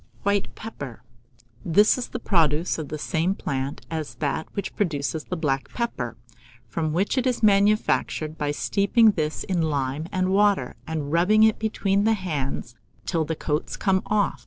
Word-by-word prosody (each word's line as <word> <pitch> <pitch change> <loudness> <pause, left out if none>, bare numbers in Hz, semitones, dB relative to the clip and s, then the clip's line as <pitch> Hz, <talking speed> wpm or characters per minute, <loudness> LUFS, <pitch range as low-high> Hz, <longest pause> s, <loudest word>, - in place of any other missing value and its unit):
WHITE 200 -1 0
PEPPER. 140 - -8 0.6
This 205 +6 +5
is 255 - -4
the - - -5
produce 165 -6 +1
of 155 - -4
the 155 - -4
same 170 +4 0
plant 135 -4 -4
as 160 -2 -4
that 150 +1 -2
which 200 - -4
produces 155 -4 -1
the 180 - -4
black 135 -4 -1
pepper, 235 -1 -3 0.5
from 155 -2 -2
which 195 - +1
it 255 - 0
is 245 -2 -1
manufactured 200 -6 +2
by 150 -2 -2
steeping 200 +9 +3
this 155 -5 -2
in 180 -3 -1
lime 145 0 -1
and 185 0 0
water, 200 -9 +2
and 155 -3 -3
rubbing 190 +6 +4
it 220 -1 +4
between 200 -2 +1
the 225 - +4
hands 145 - -3 0.3
till 165 -3 0
the 160 - -2
coats 150 0 -2
come 190 -2 +2
off. 210 -1 +1
170 Hz, 165 wpm, -25 LUFS, 150-205 Hz, 0.6 s, This